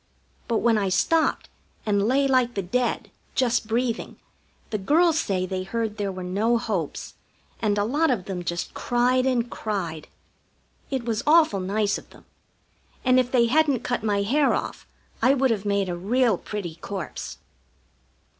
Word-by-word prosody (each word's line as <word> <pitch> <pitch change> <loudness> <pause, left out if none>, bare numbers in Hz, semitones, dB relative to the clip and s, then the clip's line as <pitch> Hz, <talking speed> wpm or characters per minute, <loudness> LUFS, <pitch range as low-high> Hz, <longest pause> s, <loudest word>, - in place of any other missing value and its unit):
But 230 -2 0
when 230 -2 +3
I 195 -2 0
stopped 320 - +1 0.4
and 205 -1 +2
lay 275 +3 +3
like 255 -2 +2
the 195 - -1
dead, 245 +7 -1 0.2
just 240 -3 +1
breathing, 230 +1 -1 0.6
the 215 - -1
girls 320 - +3
say 185 - -1
they 185 0 -3
heard 220 +2 -3
there 200 -2 -2
were 185 -1 -6
no 210 +6 +1
hopes, 195 -9 -3 0.5
and 210 -2 +1
a 205 - +2
lot 295 +9 +1
of 220 -8 0
them 185 -3 -4
just 175 0 -3
cried 250 +2 +1
and 245 -2 +1
cried. 175 -8 -4 0.8
It 265 -4 -2
was 225 -2 -1
awful 310 -10 +5
nice 200 +2 0
of - - -19
them, - - -18 0.8
and 255 0 +5
if 250 0 0
they 240 -2 +4
hadn't 280 0 +2
cut 245 -2 -1
my 205 -2 +1
hair 275 +7 +2
off - - -5 0.3
I 270 - +5
would 265 -2 +2
have 210 -3 -2
made 200 -1 +1
a 175 - -2
real 225 +5 +2
pretty 175 -4 -6
corpse. 190 -1 -6
225 Hz, 165 wpm, -25 LUFS, 195-255 Hz, 0.8 s, awful